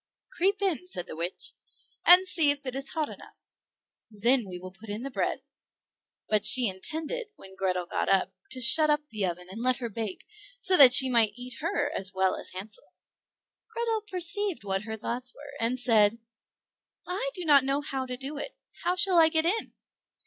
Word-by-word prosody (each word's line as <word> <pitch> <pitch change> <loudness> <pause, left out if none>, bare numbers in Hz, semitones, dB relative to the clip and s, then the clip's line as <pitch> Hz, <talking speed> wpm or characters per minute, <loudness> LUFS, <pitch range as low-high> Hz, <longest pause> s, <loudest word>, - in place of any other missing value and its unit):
"Creep 395 -2 -1
in," 360 -2 -1
said 180 - -4
the - - -10
witch, 170 +3 -5 0.5
"and 360 +2 +8
see 320 -5 +3
if 285 -1 -1
it 255 -1 -4
is 275 0 -1
hot 310 -2 -2
enough, - - -15 0.6
and 210 -1 -17
then 245 -2 +3
we 180 - -7
will 185 +1 -10
put 210 +3 -15
in 210 +4 -5
the 275 - -6
bread"; - - -3 0.8
but 215 -1 +1
she 255 -3 +6
intended 315 - -5
when 190 0 -15
Grethel 185 -2 -2
got - - -3
in 190 -1 +1 0.2
to 260 - -5
shut 305 +6 +9
up 295 0 +2
the 215 -2 -3
oven 180 +1 -6
and 200 +5 -9
let 255 +1 +2
her 245 -2 -6
bake, 220 -3 -6 0.3
so 375 -5 +4
that 260 -6 +8
she 265 - +8
might 230 -4 +2
eat 250 +1 -10
her 310 -3 -2
as 190 -1 -4
well 190 0 +1
as - - -3
Hansel. 200 - -11 0.8
Grethel 455 -1 -2
perceived 370 - -3
what 195 0 -3
her 220 -1 -6
thoughts 245 +3 -6
were, 290 0 -13
and 235 +3 -1
said, 225 -3 +3 0.9
"I 405 +8 -3
do 360 -2 -5
not 285 -3 +5
know 275 +2 -1
how 270 -3 -5
to 250 0 -6
do 275 +3 -7
it; - - -8 0.3
how 350 +1 0
shall 370 -1 +4
I 320 -1 +6
get 320 0 +1
in?" 420 +6 -2
255 Hz, 200 wpm, -27 LUFS, 210-330 Hz, 0.9 s, shut